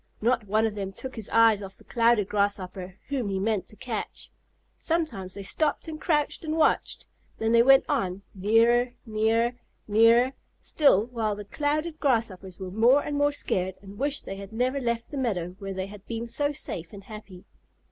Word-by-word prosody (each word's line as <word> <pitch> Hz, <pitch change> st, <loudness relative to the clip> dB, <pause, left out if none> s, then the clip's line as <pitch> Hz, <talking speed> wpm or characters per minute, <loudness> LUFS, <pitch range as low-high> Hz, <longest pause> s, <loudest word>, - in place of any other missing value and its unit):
Not 235 Hz, -1 st, +1 dB
one 215 Hz, +3 st, +2 dB
of 220 Hz, -, -1 dB
them 195 Hz, -2 st, -4 dB
took 260 Hz, +6 st, -7 dB
his 220 Hz, -4 st, -6 dB
eyes 225 Hz, -2 st, +5 dB
off 195 Hz, -1 st, -8 dB
the -, -, -13 dB
Clouded 230 Hz, -4 st, +2 dB
Grasshopper 190 Hz, -3 st, -2 dB
whom 260 Hz, -7 st, -1 dB
he 195 Hz, -, -1 dB
meant 200 Hz, -1 st, -1 dB
to -, -, -9 dB
catch. 225 Hz, -1 st, -5 dB, 0.5 s
Sometimes 310 Hz, -, -2 dB
they 200 Hz, -, -6 dB
stopped 300 Hz, -, -1 dB
and 310 Hz, -1 st, -7 dB
crouched 300 Hz, -2 st, 0 dB
and 315 Hz, 0 st, -2 dB
watched, 315 Hz, -, +1 dB, 0.3 s
then 225 Hz, 0 st, 0 dB
they 230 Hz, 0 st, +6 dB
went 270 Hz, +2 st, +6 dB
on, 200 Hz, -10 st, -1 dB
nearer, 230 Hz, +5 st, +3 dB
nearer, 225 Hz, +2 st, +1 dB, 0.3 s
nearer, 230 Hz, +4 st, +5 dB, 0.3 s
still, 250 Hz, -9 st, +3 dB
while 225 Hz, -4 st, -2 dB
the 205 Hz, 0 st, -8 dB
Clouded 305 Hz, +7 st, -2 dB
Grasshoppers 210 Hz, -, -1 dB
were 185 Hz, -1 st, -6 dB
more 240 Hz, +8 st, +4 dB
and 295 Hz, -, -3 dB
more 290 Hz, 0 st, +3 dB
scared 185 Hz, -9 st, -1 dB
and 200 Hz, +1 st, -11 dB
wished 285 Hz, +1 st, -1 dB
they 195 Hz, -, -6 dB
had 200 Hz, +1 st, -9 dB
never 255 Hz, +5 st, 0 dB
left 235 Hz, -1 st, -2 dB
the 290 Hz, -, -5 dB
meadow 200 Hz, -10 st, -1 dB
where 195 Hz, -1 st, -5 dB
they 190 Hz, 0 st, -2 dB
had 200 Hz, 0 st, -11 dB
been 230 Hz, 0 st, -4 dB
so 285 Hz, +5 st, -1 dB
safe 175 Hz, -, -6 dB
and 200 Hz, -1 st, -10 dB
happy. 205 Hz, -3 st, -11 dB
225 Hz, 190 wpm, -27 LUFS, 200-260 Hz, 0.5 s, they